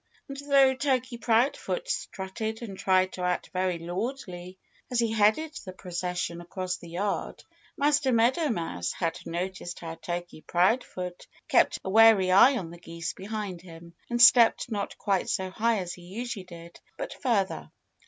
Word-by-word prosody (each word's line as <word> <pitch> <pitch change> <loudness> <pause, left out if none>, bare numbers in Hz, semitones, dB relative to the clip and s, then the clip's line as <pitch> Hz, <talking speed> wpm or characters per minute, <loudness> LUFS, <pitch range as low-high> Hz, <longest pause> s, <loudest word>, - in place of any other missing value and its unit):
And 275 - -7
though 275 -1 +4
Turkey 255 -3 -1
Proudfoot 245 - +1
strutted 220 - -4
and 200 -4 -7
tried 185 0 +2
to 185 - -6
act 180 0 -1
very 185 -1 0
lordly 180 0 -5 0.3
as 250 - -1
he 230 -1 +2
headed 220 +9 +2
the 185 - -8
procession 180 -2 -4
across 180 +1 -4
the 170 - -12
yard, 195 +4 -3 0.3
Master 285 -2 +2
Meadow 250 +7 +3
Mouse 165 - -2
had 165 -1 -2
noticed 180 +1 -4
how 165 -1 -6
Turkey 175 0 -6
Proudfoot 180 -1 0 0.2
kept - - +3
a 190 - -3
wary 220 -3 +6
eye 245 +8 +7
on 170 -7 -5
the 170 - -11
geese 165 -1 -5
behind 200 -3 -5
him, 170 -1 -13 0.2
and 240 0 -1
stepped 240 0 +6
not 205 -2 -3
quite 195 -3 0
so 190 0 -1
high 225 +3 +1
as 180 -3 -4
he 180 - -12
usually 200 +2 -6
did, 170 -1 -12 0.2
but - - -5
further. 215 -8 0
190 Hz, 160 wpm, -27 LUFS, 175-235 Hz, 0.3 s, eye